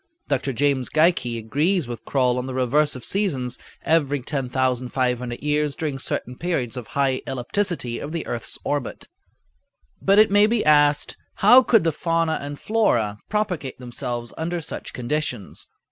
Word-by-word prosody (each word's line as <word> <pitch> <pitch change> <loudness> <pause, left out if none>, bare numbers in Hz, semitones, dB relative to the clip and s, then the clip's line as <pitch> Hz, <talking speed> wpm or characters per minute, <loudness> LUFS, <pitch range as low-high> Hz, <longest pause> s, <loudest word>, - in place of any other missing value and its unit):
Dr. 135 -1 0
James 135 0 +1
Geikie 155 -7 +2
agrees 145 - 0
with 120 -2 -7
Croll 125 -2 +1
on 125 - -4
the 130 - -5
reverse 140 +4 +2
of 125 - -7
seasons 140 -12 -1 0.2
every 145 -3 +2
10,500 125 -2 -1
years 150 -1 0
during 150 -4 -3
certain 125 -1 -4
periods 140 -9 -1
of 125 -4 -6
high 135 -2 0
ellipticity 130 -1 -2
of 145 - -5
the 165 -1 -3
earth's 120 -1 -5
orbit. 145 -3 -3 0.9
But 195 +1 +4
it 215 -1 +6
may 205 +1 +6
be 230 -4 0
asked, 145 -1 +4 0.2
"How 245 +6 +7
could 225 -5 +4
the 165 - +2
fauna 165 +1 0
and 145 0 -6
flora 120 - +1
propagate 190 -11 -2
themselves 120 -1 -5
under 170 +2 -2
such 160 - -6
conditions?" 125 -4 -3
140 Hz, 150 wpm, -23 LUFS, 125-165 Hz, 0.9 s, How